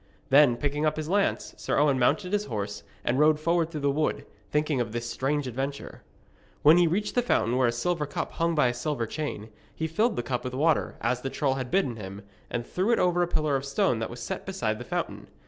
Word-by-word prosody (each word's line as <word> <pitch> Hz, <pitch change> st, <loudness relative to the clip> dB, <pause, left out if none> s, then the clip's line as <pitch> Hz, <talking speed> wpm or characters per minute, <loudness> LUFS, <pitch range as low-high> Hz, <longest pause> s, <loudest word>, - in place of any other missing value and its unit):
Then, 135 Hz, -3 st, +6 dB
picking 145 Hz, +2 st, -1 dB
up 155 Hz, 0 st, +1 dB
his 155 Hz, 0 st, -4 dB
lance, 200 Hz, +2 st, 0 dB
Sir -, -, -1 dB
Owen 145 Hz, -3 st, +3 dB
mounted 180 Hz, +10 st, +1 dB
his 205 Hz, 0 st, +1 dB
horse, 105 Hz, -3 st, -4 dB, 0.2 s
and 125 Hz, +3 st, +1 dB
rode 150 Hz, 0 st, +5 dB
forward 165 Hz, +1 st, +1 dB
through 155 Hz, -3 st, -5 dB
the 140 Hz, 0 st, +2 dB
wood, 150 Hz, +2 st, -1 dB, 0.2 s
thinking 150 Hz, -3 st, +1 dB
of 115 Hz, -2 st, -4 dB
this 120 Hz, 0 st, -3 dB
strange 135 Hz, +5 st, -1 dB
adventure. 135 Hz, +3 st, -5 dB, 0.6 s
When 155 Hz, +4 st, +7 dB
he 175 Hz, -, +5 dB
reached 205 Hz, +6 st, -1 dB
the 245 Hz, -, +3 dB
fountain 125 Hz, -, +1 dB
where 130 Hz, -1 st, +3 dB
a -, -, +2 dB
silver 150 Hz, +5 st, -1 dB
cup 145 Hz, -, -4 dB
hung 165 Hz, 0 st, 0 dB
by 150 Hz, -5 st, +4 dB
a -, -, -1 dB
silver 120 Hz, -1 st, -2 dB
chain, 110 Hz, -5 st, -5 dB, 0.3 s
he 160 Hz, -, -2 dB
filled 215 Hz, +9 st, +1 dB
the 120 Hz, -, -2 dB
cup 125 Hz, -1 st, -2 dB
with 125 Hz, 0 st, -4 dB
water, 155 Hz, +3 st, +1 dB
as 125 Hz, +2 st, 0 dB
the 135 Hz, -, -3 dB
troll 135 Hz, -1 st, 0 dB
had 130 Hz, -2 st, -4 dB
bidden 165 Hz, -11 st, +1 dB
him, 100 Hz, -1 st, -8 dB, 0.3 s
and 120 Hz, 0 st, -3 dB
threw 185 Hz, -, -1 dB
it 235 Hz, -, +4 dB
over 175 Hz, -1 st, +2 dB
a 175 Hz, -, +2 dB
pillar 155 Hz, -4 st, 0 dB
of 135 Hz, -, -1 dB
stone 140 Hz, -4 st, +1 dB
that 115 Hz, -, -3 dB
was -, -, -8 dB
set -, -, -4 dB
beside -, -, -2 dB
the -, -, -7 dB
fountain. -, -, -4 dB
145 Hz, 235 wpm, -27 LUFS, 125-165 Hz, 0.6 s, When